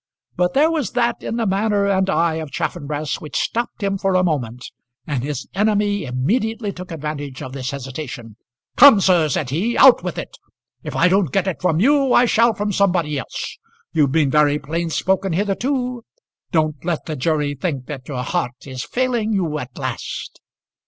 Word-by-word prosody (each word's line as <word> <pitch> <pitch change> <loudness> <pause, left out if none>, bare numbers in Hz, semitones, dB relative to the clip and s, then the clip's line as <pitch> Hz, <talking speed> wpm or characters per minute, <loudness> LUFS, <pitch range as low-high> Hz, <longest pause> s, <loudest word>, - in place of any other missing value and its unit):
But 180 +4 0
there 305 +4 +4
was 300 - -2
that 240 -1 0
in - - -4
the 230 -1 0
manner 200 +1 +1
and 190 -1 +1
eye 165 -2 +1
of 160 -2 -5
Chaffanbrass 150 -1 -3
which 150 - -4
stopped 235 -2 -2
him 195 -1 0
for 195 -1 +1
a 185 - +4
moment, 125 -8 -2 0.3
and 140 -5 -2
his 140 -2 -4
enemy 205 -1 +1
immediately 210 - -1
took 180 0 -9
advantage 150 -4 -5
of 130 - -7
this 130 -2 -4
hesitation. 135 -4 -7 0.4
"Come 280 -8 +9
sir," 175 -5 +3
said 130 -1 -1
he, 205 - 0
"out 265 -2 +7
with - - -4
it. - - -7 0.4
If - - -6
I - - +4
don't 185 -1 +2
get 195 -2 +1
it 190 -3 -3
from 165 -3 +1
you, 275 +3 +3
I 245 - +6
shall 230 -1 +3
from 205 0 -2
somebody 175 -7 +1
else. - - -6 0.3
You've 145 -4 +3
been 145 -2 +2
very 150 0 +4
plain 165 +3 -3
spoken 190 +2 0
hitherto. 245 - -1 0.5
Don't 155 -5 0
let 170 -2 -2
the 155 - -4
jury 150 +1 0
think 140 -2 -3
that 135 -3 -8
your 130 -4 -3
heart 125 -1 -3
is 130 -2 -6
failing 240 -4 -1
you 165 -6 -1
at 125 -2 -8
last." - - -5
170 Hz, 185 wpm, -20 LUFS, 145-205 Hz, 0.5 s, Come